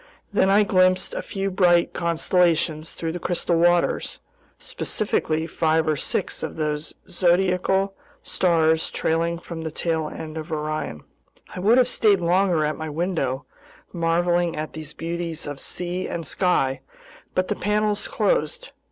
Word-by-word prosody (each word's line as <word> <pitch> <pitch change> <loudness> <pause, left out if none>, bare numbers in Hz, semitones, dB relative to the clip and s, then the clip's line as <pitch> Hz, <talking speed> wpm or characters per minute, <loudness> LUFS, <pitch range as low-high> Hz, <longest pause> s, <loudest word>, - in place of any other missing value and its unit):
Then 190 - +3
I 205 +2 +5
glimpsed 185 -1 +3
a - - -3
few 195 0 -3
bright 175 -2 +3
constellations 170 -2 +1
through 165 -1 -3
the 175 - -5
crystal 175 0 0
waters, 175 +1 +2 0.4
specifically 160 -6 -1
five 160 -1 +1
or 155 - +2
six - - -2
of - - -4
those 150 -1 -3
zodiacal 185 +2 +2 0.3
stars 160 -3 +2
trailing 165 +1 0
from 170 -1 -8
the 160 - -3
tail 160 0 -2
end 160 0 -7
of 160 +2 -8
Orion. 155 - -3 0.5
I - - -5
would 215 +6 +4
have 255 -1 +5
stayed 210 -5 +3
longer 175 -2 +2
at 150 - -2
my 160 0 -4
window, 150 -5 -2 0.5
marveling 175 0 +1
at 155 0 -5
these 155 -1 -7
beauties 165 -1 -4
of 145 -2 -6
sea 180 +4 -3
and 165 -1 -4
sky, 140 -6 +1 0.5
but 185 0 +1
the - - -1
panels 210 +1 0
closed. - - -1
170 Hz, 145 wpm, -23 LUFS, 160-185 Hz, 0.5 s, I